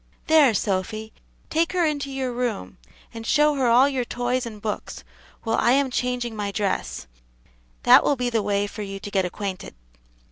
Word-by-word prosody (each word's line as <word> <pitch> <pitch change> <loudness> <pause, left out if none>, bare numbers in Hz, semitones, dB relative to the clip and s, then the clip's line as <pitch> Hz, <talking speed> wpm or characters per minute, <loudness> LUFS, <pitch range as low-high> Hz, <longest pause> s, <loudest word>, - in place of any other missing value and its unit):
There, 305 -8 +5
Sophy, 215 +3 -2 0.4
take 325 +2 +1
her 355 -2 +2
into 285 -2 -1
your 265 -2 -3
room, 240 - -3 0.3
and 225 -1 -7
show 300 +5 +3
her 265 -3 +1
all 245 +4 +6
your 265 -3 -1
toys 245 +1 -2
and 215 -2 -9
books, 210 0 -5 0.4
while 225 -1 0
I 240 - +3
am 275 -1 +2
changing 250 -2 -2
my 205 -1 -3
dress; 190 - -2 0.8
that - - +7
will 285 - +2
be 245 -1 -2
the 225 -2 +1
way 205 0 0
for 210 +1 -7
you 195 -1 -6
to 205 +1 -8
get 190 -2 +1
acquainted." 190 - -5
235 Hz, 180 wpm, -24 LUFS, 205-265 Hz, 0.8 s, that